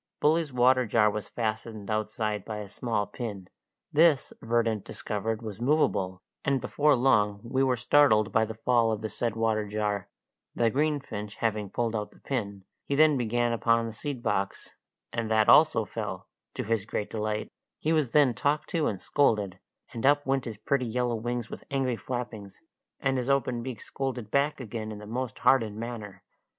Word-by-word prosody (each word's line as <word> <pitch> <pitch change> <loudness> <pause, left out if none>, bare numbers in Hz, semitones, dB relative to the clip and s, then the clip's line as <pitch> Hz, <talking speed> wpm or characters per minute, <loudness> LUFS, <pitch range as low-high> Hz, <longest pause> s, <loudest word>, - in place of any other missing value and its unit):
Bully's 155 0 +2
water 125 0 +4
jar 105 -1 +4
was 105 -1 -5
fastened 110 -2 -3
outside 110 0 -1
by 110 - -5
a 105 -1 -6
small 105 0 -1
pin; 105 -3 -6 0.5
this 155 -2 +4
Verdant 115 -2 +1
discovered 110 +2 -3
was 110 0 -7
movable, 100 -10 +1 0.2
and 140 -1 +2
before 145 +3 +2
long 105 -5 +3
we 130 +3 -1
were 130 -2 +2
startled 120 -4 +4
by 110 - +3
the 110 0 -4
fall 115 0 +2
of 110 -1 -2
the 110 - -2
said 115 -1 -2
water 110 -2 0
jar, 105 -1 -2 0.5
the 115 -1 +2
greenfinch 135 -8 -2
having 105 -3 -1
pulled 115 +2 -1
out 105 -1 -2
the - - -21
pin; 100 -7 -4 0.2
he 140 - -2
then 155 0 +5
began 120 -1 +1
upon 115 0 +2
the 115 - -5
seed 130 +1 -5
box, 100 0 -2 0.4
and 115 -1 -2
that 110 -1 +3
also 155 -8 +6
fell, - - -5 0.3
to - - -2
his 110 -2 0
great 105 - -3
delight; 110 -1 -2 0.3
he 160 - 0
was 150 -7 +1
then 145 -5 +5
talked 145 +5 0
to 165 -3 +1
and 95 - -3
scolded, 105 -9 +1 0.3
and 115 - -5
up 145 +1 +4
went 135 -1 0
his 110 -3 -6
pretty 130 +4 0
yellow 120 +1 0
wings 120 0 -3
with - - -7
angry 135 -3 0
flappings, 115 -5 -6 0.4
and 135 -1 +1
his 125 +1 -2
open 130 -3 +1
beak 125 -3 -6
scolded 125 -5 -4
back 140 +2 +1
again 110 -3 -5
in 105 - -6
the 105 - -10
most 120 +1 -4
hardened 110 -6 +4
manner. 110 -4 -7
115 Hz, 180 wpm, -28 LUFS, 105-130 Hz, 0.5 s, also